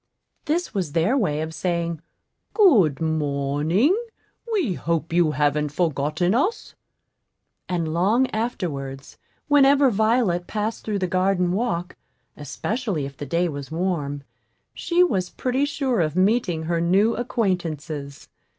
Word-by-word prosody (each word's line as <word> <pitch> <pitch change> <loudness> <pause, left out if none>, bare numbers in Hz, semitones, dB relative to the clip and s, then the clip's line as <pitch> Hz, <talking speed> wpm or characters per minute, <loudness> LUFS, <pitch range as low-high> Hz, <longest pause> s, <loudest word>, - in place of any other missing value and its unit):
This 340 +4 -1
was 180 -8 -2
their 175 +10 +2
way 155 - 0
of 160 0 -4
saying, 170 -1 -2 0.5
"Good 220 - +5
morning; 155 - +1 0.6
we 355 - +1
hope 165 -1 -2
you 170 -2 +4
haven't 150 +1 +1
forgotten 160 +2 0
us." 375 - -1 1.0
And 165 -3 -1
long 205 +10 +3
afterwards, 145 - -4 0.3
whenever 280 -2 +5
Violet 215 -5 +1
passed 215 +1 -3
through 210 -2 -2
the 190 - -1
garden 185 0 +1
walk, 185 -4 -2 0.4
especially 185 - -3
if 140 0 -8
the 145 - -7
day 170 +5 +1
was 140 -4 -6
warm, 155 -5 -2 0.5
she 350 +1 +2
was 185 - 0
pretty 260 +2 -1
sure 270 -6 0
of 155 -1 -1
meeting 185 -4 +1
her 165 +1 -1
new 195 +7 +3
acquaintances. 165 - -3
175 Hz, 125 wpm, -23 LUFS, 155-225 Hz, 1.0 s, Good